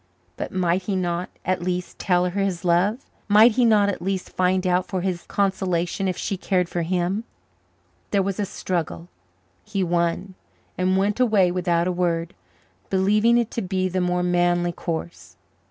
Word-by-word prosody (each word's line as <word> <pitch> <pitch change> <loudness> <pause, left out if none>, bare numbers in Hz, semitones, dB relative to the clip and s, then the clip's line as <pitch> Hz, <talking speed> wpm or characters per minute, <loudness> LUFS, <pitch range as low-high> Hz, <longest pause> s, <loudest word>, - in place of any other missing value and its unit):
But - - -5
might 180 0 +1
he 200 - -1
not, 175 -1 -2 0.2
at 185 -1 0
least, 180 0 -3
tell 180 -2 +2
her 190 +3 -2
his 185 -3 -2
love? 190 +9 +2 0.2
Might 215 +3 +7
he 245 +2 +2
not, 210 -3 +4
at 200 - -2
least, 190 0 -3
find 185 +1 +1
out 180 0 +1
for 185 - -2
his 180 -2 -3
consolation 190 -1 0
if 185 -1 -2
she 195 - -2
cared 180 -1 0
for 175 - -3
him? 180 +4 -1 0.9
There 200 -1 +2
was 195 +1 -3
a 205 - +1
struggle; 160 - -4 0.5
he 200 -3 -2
won, 175 +2 -1 0.4
and 185 +1 +1
went 200 +4 0
away 210 -7 +4
without 175 -1 +1
a - - +1
word, 170 -2 -1 0.6
believing 210 +5 +3
it 235 -2 0
to 230 - -3
be 185 -1 -1
the 185 0 -1
more 180 0 0
manly 175 0 +2
course. 160 - -6
185 Hz, 170 wpm, -23 LUFS, 175-195 Hz, 0.9 s, Might